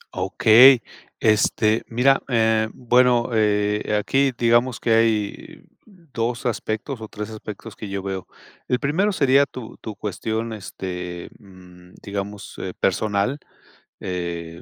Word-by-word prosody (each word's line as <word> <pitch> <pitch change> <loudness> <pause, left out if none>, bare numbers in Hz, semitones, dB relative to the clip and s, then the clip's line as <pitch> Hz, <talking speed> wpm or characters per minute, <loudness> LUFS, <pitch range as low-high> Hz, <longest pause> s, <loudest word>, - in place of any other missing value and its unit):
Okey. 110 +6 +6 0.4
Este, 110 0 +2
mira, 130 +4 +3
eh, 110 -2 +2
bueno, 125 -1 +2
eh, 105 -1 +1
aquí 135 +5 +1
digamos 120 +1 +2
que 115 - +1
hay 110 -2 0 0.2
2 125 - -5
aspectos 115 +1 -3
o 110 - -6
3 105 +1 -7
aspectos 110 0 -9
que 105 - -8
yo 100 -1 -4
veo. 95 -2 -5 0.4
El 125 - +1
primero 185 +9 +1
sería 140 -4 +3
tu 125 -3 -9
tu 110 -2 -7
cuestión, 110 +3 -4
este, 90 -3 -6
mm, 90 -2 -17
digamos, 100 0 -6
eh, 95 - -5
personal, 105 +7 0 0.6
eh, 85 -2 -5
110 Hz, 125 wpm, -22 LUFS, 100-120 Hz, 0.6 s, Okey